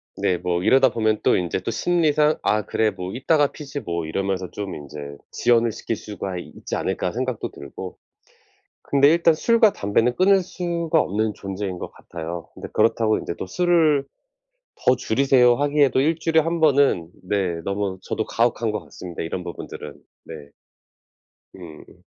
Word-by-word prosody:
네. 90 - 0
뭐 90 0 -1
이러다 130 +4 +5
보면 110 -2 +1
또 - - +4
인제 90 -1 -1
심리상 155 +1 +2
'아 105 0 +1
그래. 110 - +1
뭐 90 0 -6
이따가 145 +3 +2
피지 145 -1 -7
뭐.' 85 -1 -3
이러면서 95 +2 -2
좀 100 -2 -5
인제 70 0 -8
'지연을 120 -1 +2
시킬 115 - -4
수가 100 -3 -6
있지 90 - -6
않을까?' 90 - -1
생각도 125 +1 -3
들고. 75 +6 -9 0.9
근데 140 0 +4
일단 165 +1 +4
술과 225 +5 +4
담배는 115 +4 +1
끊을 195 +1 +5
수가 170 -2 -1
없는 105 0 -1
존재인 95 -1 -5
것 - - -6
같아요. 85 0 -7
근데 - - -8
그렇다고 110 0 +2
인제 - - -5
"또 - - -4
술을 160 - +2 0.8
더 125 - +6
줄이세요." 125 0 +4
하기에도 145 -1 +2
1 155 +4 +2
주일에 160 0 +3
1 165 +1 -1
번은 140 - +3
네 90 -3 -1
너무 100 -1 -2
저도 110 - -2
가혹한 115 -1 +1
것 105 - -3
같습니다, 90 -2 -8
이런 85 +2 -4
부분들은. 85 - -8 0.3
네. 75 -3 -10 1.1
음. 85 -5 -13
110 Hz, 310 characters per minute, -23 LUFS, 90-145 Hz, 1.1 s, 더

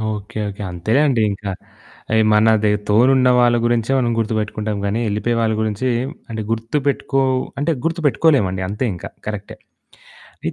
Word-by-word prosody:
Okay. 105 +2 -9
Okay. 100 +2 -9
అంతేలేండి 115 - +1
ఇంకా. 100 0 -5 0.6
అయి 110 0 +4
మనది 105 -1 +4 0.2
తోడున్న 125 +4 +4
వాళ్ళ 120 -1 +4
గురించే 120 +1 +1
మనం 120 -2 +1
గుర్తుబెట్టుకుంటాం 110 -1 -2
గానీ, 105 +3 -1
ఎళ్ళిపోయే 105 +3 -1
వాళ్ళ 110 -1 +1
గురించి 110 +3 -1 0.4
అంటే, 110 - -3
గుర్తుబెట్టుకో 135 +4 0 0.4
అంటే 165 +3 +1
గుర్తుబెట్టుకోలేమండి. 145 - +1
అంతే 105 +5 -2
ఇంకా. 85 - -8 0.2
కరెక్టే. 105 -1 -6 0.9
అయి - - -2
110 Hz, 130 wpm, -19 LUFS, 105-130 Hz, 0.9 s, అయి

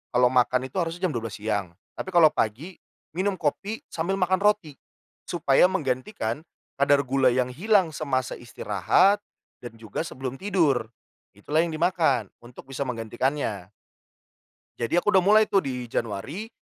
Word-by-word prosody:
kalau 125 0 +4
makan 130 0 +2
itu - - -2
harusnya 170 +1 -3
jam - - -3
12.00 115 -4 -4
siang. 105 -5 -3 0.2
Tapi - - -4
kalau 160 -3 +7
pagi 135 - -3 0.3
minum 190 +4 -1
kopi 195 +7 -3
sambil 170 +4 -1
makan 185 -1 +1
roti, 205 -9 +1 0.5
supaya 170 -1 +3
menggantikan 145 - -3 0.3
kadar 140 0 +4
gula 135 0 +2
yang 125 0 +1
hilang 185 - +2
semasa 135 -4 -2
istirahat 120 - +2 0.4
dan 120 -2 -10
juga 110 -2 -7
sebelum 130 -2 -6
tidur, 165 - +1 0.5
itulah 145 +10 -1
yang 165 -1 0
dimakan 155 - +1
untuk 120 +1 -13
bisa 135 +1 -3
menggantikannya. 115 -3 -2 1.1
Jadi, 120 +8 0
aku 210 +4 +2
udah 190 - +6
mulai 210 +4 +5
tuh 195 -2 +2
di 125 -4 -4
Januari. 120 - -4
140 Hz, 145 wpm, -25 LUFS, 120-180 Hz, 1.1 s, kalau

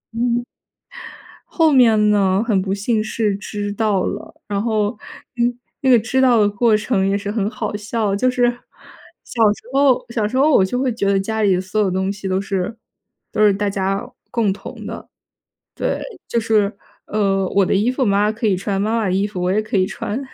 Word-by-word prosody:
嗯， 240 +1 0 1.0
后 325 -2 +2
面 225 -6 +5
呢， 195 0 +2
很 210 -5 +2
不 190 0 -2
幸 215 +3 0
是 215 -1 -1
知 205 0 -5
道 205 -3 +1
了， - - -6
然 200 -1 -1
后 215 -2 +1 0.5
嗯， 240 0 +1 0.2
那 265 - +1
个 250 - +7
知 240 +4 -1
道 245 -4 +5
的 205 - +3
过 215 +2 +2
程 210 -2 0
也 200 - +1
是 205 0 -4
很 210 -2 -1
好 215 -2 -4
笑。 210 0 -2
就 230 +6 +2
是 250 -1 +2 0.8
小 235 - -4
时 - - -15
候 270 -2 +3
小 225 -3 -1
时 215 - -6
候 290 +4 +4
我 190 - +5
就 220 +6 -2
会 255 0 0
觉 210 -3 -1
得 200 0 +3
家 220 +3 -2
里 195 -3 +3
所 190 +3 -3
有 200 - +2
东 190 +1 -1
西 200 -1 -6
都 190 0 0
是 195 +2 -3 0.5
都 - - -1
是 205 - +5
大 205 +1 -1
家 195 0 -1 0.3
共 225 -4 +1
同 195 - -8
的。 - - -7 0.7
对， - - -1 0.3
就 235 - 0
是 215 -2 +1 0.3
呃， 195 -2 0
我 200 - +3
的 - - -1
衣 205 +4 +2
服 260 +1 0
妈 200 -1 +2
妈 210 - +1
可 225 +1 -3
以 195 - +2
穿， 195 +1 -2
妈 220 +2 0
妈 225 - 0
的 185 - 0
衣 195 +2 +1
服 200 -3 -6
我 180 +1 +1
也 215 +2 +1
可 215 - -3
以 185 -1 +3
穿， 215 +3 -4
210 Hz, 225 characters per minute, -19 LUFS, 195-230 Hz, 1.0 s, 个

